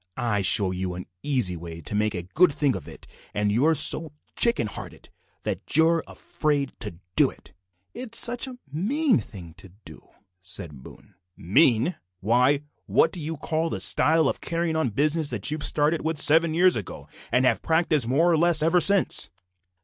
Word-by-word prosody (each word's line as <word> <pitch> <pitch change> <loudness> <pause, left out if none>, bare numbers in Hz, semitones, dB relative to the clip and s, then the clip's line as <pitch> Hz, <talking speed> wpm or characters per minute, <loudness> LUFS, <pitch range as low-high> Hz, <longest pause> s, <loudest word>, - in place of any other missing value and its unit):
I 115 -5 -1
show 95 0 +3
you 90 -1 -4
an 90 - -8 0.2
easy 125 -11 +1
way 85 0 -9
to 80 - -6
make 105 0 -1
a 90 - -5
good 155 - +2
thing 140 -2 0
of 90 -6 -8
it, - - -13 0.3
and 105 0 0
you're 145 +10 +2
so 155 +1 +3 0.2
chicken 235 - +2
hearted 105 - -9 0.3
that - - -3
you're 165 0 +3
afraid 145 -3 -3
to 105 -7 -4 0.2
do - - +4
it." - - -16 0.4
"It's 235 -2 -4
such 245 +2 +3
a 255 -1 -10 0.2
mean 250 - +1
thing 85 -7 -11
to 95 0 -11 0.2
do," - - -14 0.3
said 85 -7 -6
Boone. 100 - -16 0.2
"Mean! 125 - +2 0.2
Why, 125 +8 +1 0.2
what 160 - +2
do 180 - -2
you 160 +1 -4
call 160 +2 -2
the - - -4
style 160 -1 +4
of - - -3
carrying 165 -1 -2
on 160 -5 0
business 150 +6 -1
that 115 +1 -3
you 155 - -3
started 150 +2 0
with 160 -1 -3
seven 160 +2 +3
years 180 +2 +4
ago, 105 -5 -7 0.2
and 125 +2 +2
have - - +1
practised 160 -6 +1
more 160 +8 +2
or 165 - +2
less 170 -2 +3
ever 165 +3 +3
since?" 200 - +3
145 Hz, 180 wpm, -24 LUFS, 105-165 Hz, 0.4 s, do